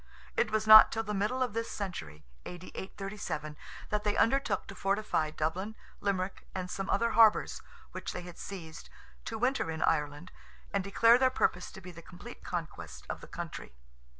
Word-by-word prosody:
It - - +2
was 215 0 0
not 215 0 +10
till 225 - -1
the 210 -1 -4
middle 215 +6 0
of 245 -5 -3
this 230 +1 -2
century 80 - -6 0.2
(A.D. 180 0 -9
837) 190 -6 -5 0.4
that 210 0 0
they 210 -1 0
undertook 230 -5 +2
to - - -9
fortify 195 -5 0
Dublin, 175 +8 -3 0.2
Limerick, 190 -1 -2
and 180 -1 -4
some 195 -1 -4
other 235 0 +2
harbours 220 -1 +4 0.3
which - - -5
they 180 - -6
had 175 -1 -11
seized, 165 -5 -8 0.4
to 225 - -4
winter 250 -5 +1
in 160 0 -2
Ireland, 150 +3 0 0.4
and 200 -1 +1
declare 230 +5 +5
their 260 0 +5
purpose 180 -8 0
to 190 - -10
be 180 0 -9
the 170 -1 -11
complete 180 +8 -12
conquest 85 - -6
of - - -6
the - - -11
country. - - -7
195 Hz, 180 wpm, -31 LUFS, 170-215 Hz, 0.4 s, not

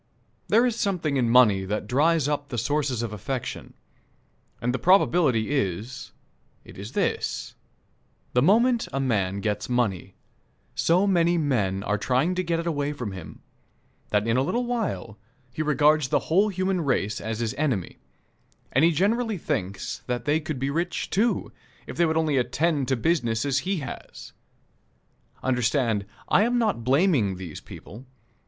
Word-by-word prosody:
There 230 +3 +4
is 245 -3 0
something 180 -10 -1
in 125 -3 +1
money 110 -6 +5
that 105 +2 -3
dries 145 +5 +2
up 145 -1 -2
the 120 - -4
sources 130 -1 0
of 110 -2 -4
affection, 120 +5 -5 0.8
and 125 +1 -1
the 130 - -2
probability 165 - +3
is, 120 -1 -2 0.5
it - - -13
is 100 +5 -8
this: - - -2 0.8
the 125 - +3
moment 230 - +3
a 135 - -2
man 100 -7 0
gets 105 +3 -2
money, 105 -7 -1 0.6
so 180 +4 +2
many 175 -3 +3
men 105 - 0
are 105 0 -1
trying 130 - +1
to 185 0 -1
get 165 -1 -1
it 165 - -4
away 145 -3 -1
from 125 -8 -5
him 95 -4 -10 0.7
that 105 0 +1
in 115 +1 +1
a - - +3
little 240 - -1
while 225 - -3 0.3
he 155 - -3
regards 150 -1 +3
the - - +2
whole 195 +6 +2
human 185 -1 -1
race 125 -8 -1
as 110 0 -3
his 115 -2 -1
enemy, 130 - -2 0.7
and 135 - +3
he 165 - +6
generally 215 +6 +1
thinks 100 - -3
that 120 -2 -2
they 150 +2 +2
could 155 -2 -5
be 135 +2 -2
rich, 170 +4 -2
too, 225 +5 +1 0.3
if - - -8
they 170 - +3
would 160 0 0
only 155 -3 +1
attend 135 +3 0
to 130 - +2
business 120 -4 0
as 140 0 +1
he 185 +3 -2
has. 135 - -9 1.1
Understand, 120 -4 +1 0.2
I - - +4
am 240 +3 +2
not 215 - 0
blaming 130 - +2
these 90 -4 -8
people. 115 +8 -12
135 Hz, 160 wpm, -25 LUFS, 115-170 Hz, 1.1 s, he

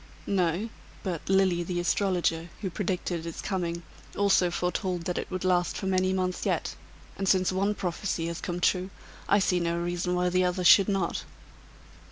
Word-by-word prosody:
"No. 185 +2 0 0.3
But 180 -4 -4
Lilly, 190 -2 +3
the 175 0 -2
astrologer, 175 -2 0
who 190 -4 -3
predicted 175 -3 -2
its 165 - -6
coming, 170 -3 -2 0.3
also 195 -3 +4
foretold 180 0 -2
that 180 +1 -2
it - - -5
would 185 0 -4
last 180 -1 +2
for - - -4
many 185 0 +2
months 185 -1 -1
yet; - - -1 0.5
and 195 -1 0
since 185 -1 +3
one 200 +3 0
prophecy 175 -2 -2
has 170 0 -4
come 175 -1 -3
true, 185 +1 +1 0.4
I 200 - +5
see 185 -2 +2
no 170 0 0
reason 175 +1 -1
why 180 0 +1
the 185 +1 +2
other 180 0 0
should 195 +3 +7
not." 195 -4 -1
180 Hz, 175 wpm, -28 LUFS, 175-190 Hz, 0.5 s, should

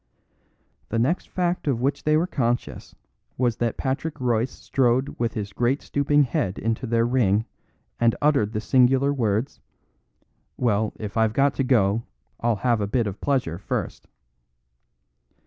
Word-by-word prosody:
The 115 - -1
next 135 +10 0
fact 180 -3 -1
of 130 -5 +1
which 135 +3 -1
they 155 0 +4
were 165 - +2
conscious 120 -8 -2 0.4
was 120 -2 +1
that 120 -2 -1
Patrick 140 +4 -3
Royce 120 -1 +1
strode 130 +1 0
with 115 -1 -1
his 100 -2 -4
great 125 +6 0
stooping 145 +1 +2
head 100 -7 -1
into 115 +3 -2
their 115 0 +2
ring 110 -4 +2 0.5
and 115 -1 +3
uttered 140 -8 +2
the 105 - -2
singular 130 +3 +3
words: 115 0 -1 1.0
"Well, 110 -3 +1
if 105 0 -6
I've 110 -1 +2
got 140 +2 +3
to 135 - -1
go, 110 -4 +2 0.4
I'll 120 -1 +1
have 120 -3 +2
a 100 - -1
bit 115 +3 0
of 100 -1 -5
pleasure 125 - 0
first." - - -4
120 Hz, 150 wpm, -24 LUFS, 110-135 Hz, 1.0 s, they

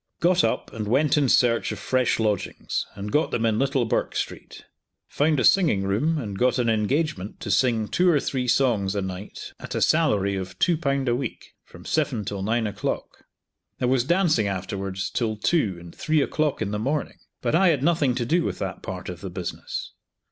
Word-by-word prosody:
Got 180 +1 +3
up - - -1
and 110 -2 -4
went 140 +7 +3
in 145 -4 +2
search 115 -1 +3
of - - -4
fresh 130 -3 +1
lodgings, 105 -4 -1
and 100 +1 -6
got 150 +2 +2
them 115 - -1
in 110 -1 +1
Little 135 -2 +1
Bourke 110 - -1
street. - - -5 0.4
Found 150 0 +2
a - - +1
singing 150 - +4
room, 115 +12 +1
and 105 -8 -5
got 125 0 +3
an 120 -2 +2
engagement 110 - -1
to - - -3
sing 115 -4 +2
two 180 +8 +2
or 155 -4 +4
three 130 -2 -2
songs 110 -7 +2
a 100 - 0
night 95 +2 -7
at - - -7
a - - 0
salary 105 -12 +2
of 95 -1 -6
two 175 - +3
pound 140 -4 -1
a 120 - +2
week, 125 -2 -6
from 90 +1 -15
seven 140 -9 0
till 100 0 -4
nine 110 +3 0
o'clock. 105 - -4 0.5
There 125 - 0
was 130 -1 +3
dancing 160 - +2
afterwards 95 0 -3
till 110 -3 -1
two 105 - +1
and 85 -1 -12
three 155 -3 +1
o'clock 150 -1 0
in 100 - -3
the 105 - -2
morning, 140 +6 -2 0.2
but - - 0
I 185 +4 +5
had 145 -6 +2
nothing 150 -6 +2
to 120 -2 -1
do 170 +7 +2
with - - -3
that 95 -2 -5
part 90 -1 -6
of 90 -1 -7
the 95 - -5
business. 90 0 -5
120 Hz, 205 wpm, -24 LUFS, 100-150 Hz, 0.5 s, I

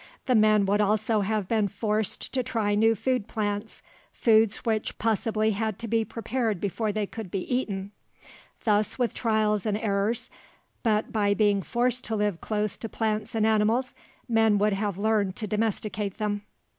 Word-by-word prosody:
The 255 - +2
men 215 -2 +5
would 205 +2 +2
also 215 +1 +2
have 205 -1 -1
been 215 -2 +2
forced 210 +1 -2
to 260 - +1
try 225 -4 -1
new 225 +2 +4
plant 250 0 0
foods 205 0 -3 0.3
foods 220 -3 +3
which 220 -2 -1
possibly 220 0 +1
had 215 -1 -2
to 230 - -5
be 225 0 +2
prepared 225 -2 -2
before 210 +3 -1
they 210 0 -1
could 220 -1 -7
be 190 +1 -2
eaten. 200 -6 -3 0.7
Thus, 210 -1 +1
with 245 -3 0
trials 215 -3 +1
and 210 -1 +1
errors, 210 +1 -1 0.5
but 215 -2 +1
by 205 -2 +2
being 205 -2 +3
forced 245 +4 0
to 225 - -2
live 205 -4 -1
close 210 -1 -1
to 225 - -6
plants 215 0 -2
and 220 -1 +2
animals, 220 +4 +2 0.3
men 225 -3 +3
would 210 +1 +2
have 200 -1 -2
learned 205 -2 +1
to 215 - -4
domesticate 210 -1 -2
them. 210 -1 -2
215 Hz, 170 wpm, -27 LUFS, 205-225 Hz, 0.7 s, men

